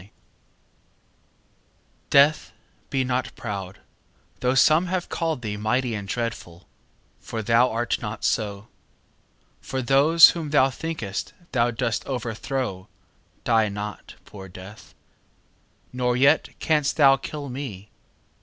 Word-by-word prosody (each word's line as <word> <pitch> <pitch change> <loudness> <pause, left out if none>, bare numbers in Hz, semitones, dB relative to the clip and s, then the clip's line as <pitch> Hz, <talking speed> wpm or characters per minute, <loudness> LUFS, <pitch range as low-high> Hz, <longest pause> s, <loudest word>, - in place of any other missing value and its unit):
Death 145 +2 +4
DEATH, - - -26 0.4
be 135 -1 0
not 130 0 -2
proud, 100 -4 -6 0.6
though 125 +1 +1
some 155 +6 +4
have 180 -1 -2
callèd 160 -6 -2
thee 105 -2 -4
Mighty 120 +3 0
and 100 -2 -5
dreadful, 100 -6 -5 0.5
for 110 -1 -6
thou 115 +4 +4
art 120 +1 -2
not 105 -1 -6
so: 105 -2 -1 0.9
For 130 -1 -4
those 145 +6 +7
whom 165 -3 -5
thou 135 -2 +3
think'st 130 -10 -5 0.2
thou 120 -2 +2
dost 115 -1 -2
overthrow 120 -4 -4 0.6
Die 110 -2 +2
not, 105 +1 -7
poor 95 -2 -11
Death; 95 +3 -13 1.0
nor 125 -1 0
yet 140 +4 +4
canst 150 -3 0
thou 135 -3 +6
kill 145 +2 -7
me. 125 -7 -7
125 Hz, 115 wpm, -24 LUFS, 105-140 Hz, 1.0 s, those